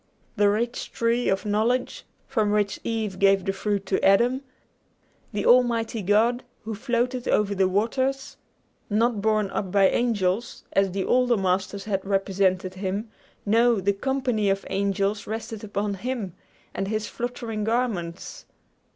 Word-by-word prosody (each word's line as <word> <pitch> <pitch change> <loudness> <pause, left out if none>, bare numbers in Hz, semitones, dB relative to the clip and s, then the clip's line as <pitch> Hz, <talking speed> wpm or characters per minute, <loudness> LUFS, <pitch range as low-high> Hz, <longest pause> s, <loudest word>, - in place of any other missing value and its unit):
The 205 -1 +4
rich 235 +4 -2
tree 235 +1 +1
of 195 +1 0
knowledge, 220 +5 0 0.2
from 220 -6 0
which 205 -1 0
Eve 215 -5 -3
gave 195 -1 +4
the 195 - 0
fruit 200 0 -2
to 190 - -1
Adam; 240 +7 +4 0.9
the 205 -2 -2
Almighty 235 -2 +3
God, 225 +6 +2 0.2
who 220 0 -4
floated 245 +2 -1
over 205 -1 +2
the 190 -1 +2
waters, 260 +8 -1 0.5
not 220 0 +1
borne 215 -2 +1
up 190 -3 -3
by 195 -1 +5
angels, 220 -3 0
as 195 0 +3
the 190 +1 -2
older 250 -2 +3
masters 190 +1 -1
had 195 -3 -2
represented 195 -1 0
him 195 +3 -4 0.3
no, 230 +1 +4
the 200 +2 +1
company 250 -2 0
of 195 0 -1
angels 200 +1 0
rested 220 0 -5
upon 205 0 -2
him 215 -2 -4 0.4
and 195 - -2
his 215 +1 -2
fluttering 235 -3 -4
garments. 210 -7 -2
210 Hz, 140 wpm, -25 LUFS, 195-235 Hz, 0.9 s, by